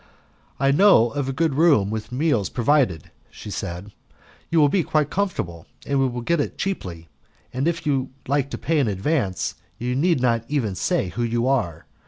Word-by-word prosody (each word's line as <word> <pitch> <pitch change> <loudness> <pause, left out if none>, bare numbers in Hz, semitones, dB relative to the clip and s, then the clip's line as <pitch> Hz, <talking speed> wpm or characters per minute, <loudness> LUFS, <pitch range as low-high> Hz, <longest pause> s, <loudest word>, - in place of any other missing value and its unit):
"I 135 0 +3
know 145 - +5
of 140 -2 -2
a - - 0
good 160 +2 0
room, 140 -10 +4
with 110 0 -5
meals 125 -6 +1
provided," 120 - +1 0.2
she 105 - -10
said; 95 +1 -5 0.6
"you 165 - +3
will 150 - +6
be 180 +6 +2
quite 155 -2 0
comfortable 90 - -3 0.2
and 140 -1 0
will 125 -2 0
get 165 +6 +1
it - - -4
cheaply, 90 - -4 0.5
and 130 +4 -1
if 170 -1 -1
you 135 -3 0 0.2
like 140 0 +1
to - - -5
pay 160 0 0
in 135 - +2
advance, 100 - -1 0.2
you 125 +1 -2
need 165 +2 +2
not 115 -2 +1
even 130 -9 -1
say 135 - 0
who 120 - -4
you 120 +1 0
are. 85 -12 0
130 Hz, 185 wpm, -23 LUFS, 110-150 Hz, 0.6 s, will